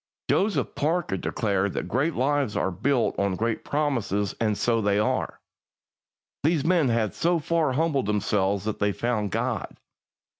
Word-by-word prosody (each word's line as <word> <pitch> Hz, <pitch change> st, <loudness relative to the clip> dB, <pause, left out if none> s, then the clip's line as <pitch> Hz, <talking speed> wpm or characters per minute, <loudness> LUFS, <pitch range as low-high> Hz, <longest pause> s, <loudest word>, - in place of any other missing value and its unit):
Joseph 190 Hz, -, +1 dB
Parker 160 Hz, -, 0 dB
declared 100 Hz, 0 st, -1 dB
that -, -, -3 dB
great 140 Hz, -, 0 dB
lives 140 Hz, -3 st, +1 dB
are 95 Hz, -, 0 dB
built 125 Hz, +7 st, +1 dB
on 100 Hz, -1 st, +1 dB
great 115 Hz, +3 st, -1 dB
promises, 120 Hz, -9 st, -1 dB
and 105 Hz, -2 st, +1 dB
so 115 Hz, -1 st, +1 dB
they 100 Hz, -1 st, +2 dB
are. 105 Hz, -, -1 dB, 1.0 s
These 155 Hz, 0 st, +1 dB
men 165 Hz, -6 st, +3 dB
had 115 Hz, -3 st, 0 dB
so 170 Hz, +2 st, +1 dB
far 160 Hz, -3 st, 0 dB
humbled 145 Hz, -5 st, +1 dB
themselves 100 Hz, -1 st, 0 dB
that 110 Hz, -, -3 dB
they 100 Hz, 0 st, +1 dB
found 110 Hz, -3 st, -1 dB
God. -, -, -2 dB
115 Hz, 150 wpm, -26 LUFS, 100-145 Hz, 1.0 s, men